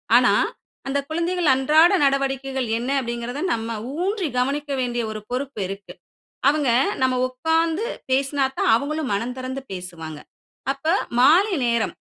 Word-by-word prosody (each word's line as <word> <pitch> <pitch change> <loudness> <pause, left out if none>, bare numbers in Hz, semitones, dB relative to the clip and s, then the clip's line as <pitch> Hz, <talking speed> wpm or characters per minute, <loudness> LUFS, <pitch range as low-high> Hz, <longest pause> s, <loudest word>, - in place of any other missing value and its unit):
ஆனா, - - +6 0.6
"அந்த 275 +1 0
குழந்தைகள் 340 +1 -1
அன்றாட 310 +7 +5
நடவடிக்கைகள் 270 -1 0
என்ன?" 240 +3 -3
அப்படீங்கிறத, 240 +3 -4
நம்ம 225 0 -3 0.3
ஊன்றி 390 -2 -1
கவனிக்க 285 +3 -1
வேண்டிய 240 -1 -1
ஒரு 215 0 -6
பொறுப்பு 260 -1 -3
இருக்கு. 195 +1 -8 0.6
அவுங்க, 290 -3 +2 0.3
நம்ம 260 0 +3
உக்காந்து 325 - 0 0.3
பேசுனாத்தான் 270 0 +1
அவுங்களும் 285 +3 -1
மனந்திறந்து 255 +5 -3
பேசுவாங்க. 170 -4 -7 0.5
அப்ப 275 +2 -12 0.3
மாலை 355 +10 +5
நேரம், 235 -2 0
270 Hz, 120 wpm, -23 LUFS, 240-305 Hz, 0.6 s, ஆனா